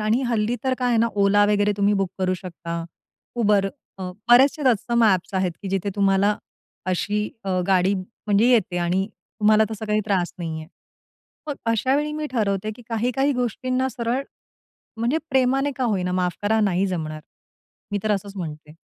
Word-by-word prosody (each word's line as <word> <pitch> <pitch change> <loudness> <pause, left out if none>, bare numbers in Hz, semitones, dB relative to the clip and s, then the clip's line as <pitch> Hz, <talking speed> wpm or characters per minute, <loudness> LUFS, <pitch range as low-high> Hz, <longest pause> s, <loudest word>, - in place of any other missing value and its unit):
आणि 215 +5 +1
हल्ली 230 0 0
तर 260 -1 +2
काय 250 -1 +1
आहे 240 - +3
ना, 230 - +4
ओला 205 0 +4
वगैरे 205 0 +2
तुम्ही 205 0 +3
बुक 190 -2 -1
करू 185 -1 +1
शकता. 170 -2 -6 0.5
Uber, 210 -3 +3 0.3
अ, 185 -1 -4 0.2
बरेचसे 270 +5 +6
तत्सम 235 0 +2
ॲप्स 190 -2 +2
आहेत, 185 -2 +1
की 195 - -4
जिथे 195 +1 -1
तुम्हाला 200 +1 +3 0.6
अशी 210 +3 -1 0.2
अ, 185 -2 0
गाडी 190 0 +3
म्हणजे 200 +3 0
येते 220 -7 +2
आणि 180 +3 0 0.3
तुम्हाला 215 +1 +5
तसा 220 0 -5
काही 210 0 +2
त्रास 185 -4 0
नाहीये. 160 -2 -5 0.8
मग 295 - -2
अशावेळी 265 +7 +1
मी 305 0 -3
ठरवते, 210 -3 0
की 245 - -13
काही-काही 250 +5 +1
गोष्टींना 255 +1 -1
सरळ, 240 +2 -2 0.7
म्हणजे 235 +7 +1
प्रेमाने 265 +2 +2
का 260 - -1
होईना, 185 -6 0
"माफ 180 -1 0
करा, 220 +2 +2
नाही 195 -2 +2
जमणार." 155 -4 -4 0.7
मी 205 - +1
तर 215 - +1
असंच 200 0 -4
म्हणते. 155 -4 -7
205 Hz, 165 wpm, -23 LUFS, 185-240 Hz, 0.8 s, बरेचसे